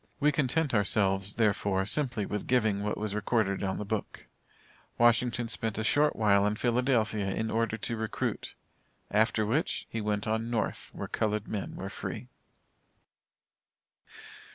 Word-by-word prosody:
We 150 0 +4
content 150 +1 +1
ourselves, 100 -1 +1
therefore, 100 -3 +1
simply 120 -2 0
with 105 0 -4
giving 110 -5 +2
what 105 0 -2
was 105 -1 -3
recorded 105 -1 0
on 95 -1 -1
the 105 - -4
book. 110 -1 -4 0.7
Wash. 120 -1 +6 0.3
spent 110 -2 -3
a 110 - -1
short 150 +6 +3
while 100 -2 +4
in 105 - 0
Philadelphia 115 -4 +1
in 110 +3 -2
order 115 -1 0
to 115 +2 -2
recruit, 110 -1 -3 0.6
after 110 +1 +2
which, 135 +10 0
he 115 - -2
went 105 -1 -1
on 110 +1 -1
North, 115 -2 -2
where - - -6
colored 105 -1 -1
men 105 -3 -4
were - - -5
free. - - -6
110 Hz, 145 wpm, -29 LUFS, 105-115 Hz, 0.7 s, Wash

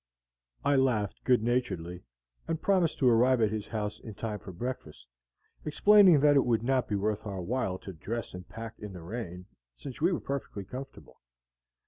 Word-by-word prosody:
I 140 -1 +4
laughed 115 -7 +1
good 125 -4 +4
naturedly, 95 -8 -1 0.5
and 165 -1 -1
promised 185 -3 +2
to 130 - +2
arrive 125 +2 +5
at 110 -2 +2
his 110 -1 -4
house 105 -2 -3
in 110 -3 -9
time 105 -1 -4
for 95 - -9
breakfast, 90 - -6 0.6
explaining 185 0 +6
that 145 0 +5
it 140 - +5
would 115 -2 +1
not 130 0 +1
be 105 - -1
worth 105 +1 -1
our 95 -2 -4
while 105 -3 -1
to 95 - -9
dress 110 +8 -5
and 90 0 -9
pack 115 0 -8
in 105 -2 -7
the 90 -2 -9
rain, 90 -2 -6 0.3
since 135 0 -9
we 170 +4 +4
were 175 - 0
perfectly 125 -7 -5
comfortable. 135 +4 -10
115 Hz, 180 wpm, -29 LUFS, 100-130 Hz, 0.6 s, explaining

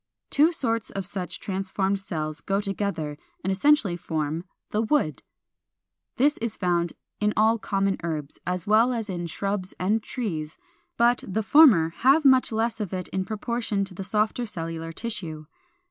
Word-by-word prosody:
Two 310 +4 +5
sorts 230 -9 -1
of 195 -1 -4
such 185 -1 -5
transformed 195 0 -1
cells 155 -6 -4
go 195 0 0
together, 195 -7 -3 0.2
and 190 - 0
essentially 205 -2 +3
form 160 0 -3 0.3
the 210 - 0
408. - - -19
=Wood.= 280 - +1 0.9
This 290 +4 +3
is 225 -1 -3
found 175 -2 0 0.3
in 210 0 +1
all 220 +2 +4
common 195 -1 0
herbs, 155 -4 -4
as 180 0 -2
well 225 +4 +4
as 225 -4 -3
in 175 -1 -3
shrubs 195 +2 -2
and 210 +5 +1
trees, 165 - -4 0.4
but 240 +1 +3
the 215 +3 -1
former 215 - +7
have 280 +5 +4
much 260 -2 +5
less 225 +1 0
of 205 -4 -4
it 185 -1 -3
in 190 0 -2
proportion 215 -1 -2
to 190 - -10
the 195 - -6
softer 215 +4 0
cellular 165 -4 -5
tissue. 170 -7 -5
195 Hz, 160 wpm, -26 LUFS, 175-225 Hz, 0.9 s, former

